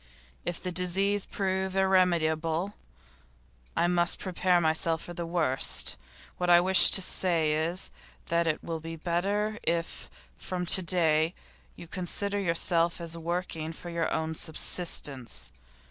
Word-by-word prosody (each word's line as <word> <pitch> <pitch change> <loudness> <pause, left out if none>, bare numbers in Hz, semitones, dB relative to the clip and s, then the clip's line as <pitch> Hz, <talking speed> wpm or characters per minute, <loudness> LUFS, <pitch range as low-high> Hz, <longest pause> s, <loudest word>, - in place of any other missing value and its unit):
If 175 - -3
the 180 - -4
disease 190 +3 +1
prove 190 -1 -2
irremediable, 175 -2 +1 1.0
I - - +3
must 175 -1 +2
prepare 180 -1 +1
myself 160 0 +1
for 175 - -8
the 170 -1 -5
worst. 160 -6 +1 0.4
What 180 0 0
I 175 0 +8
wish 185 +2 +5
to 190 - +2
say 165 -5 +1
is, 165 +4 -1 0.3
that 170 0 0
it 155 - -1
will 165 -1 -4
be 165 +1 -7
better 200 +6 -1
if 165 0 -2 0.3
from 180 - -4
to 185 - +4
day 165 -2 +2 0.4
you 170 - -11
consider 200 +4 -1
yourself 170 -2 +1
as 170 -1 -2
working 165 -1 -3
for 175 +1 -9
your 170 -1 -1
own 160 0 -1
subsistence. 150 - 0
170 Hz, 135 wpm, -28 LUFS, 165-185 Hz, 1.0 s, I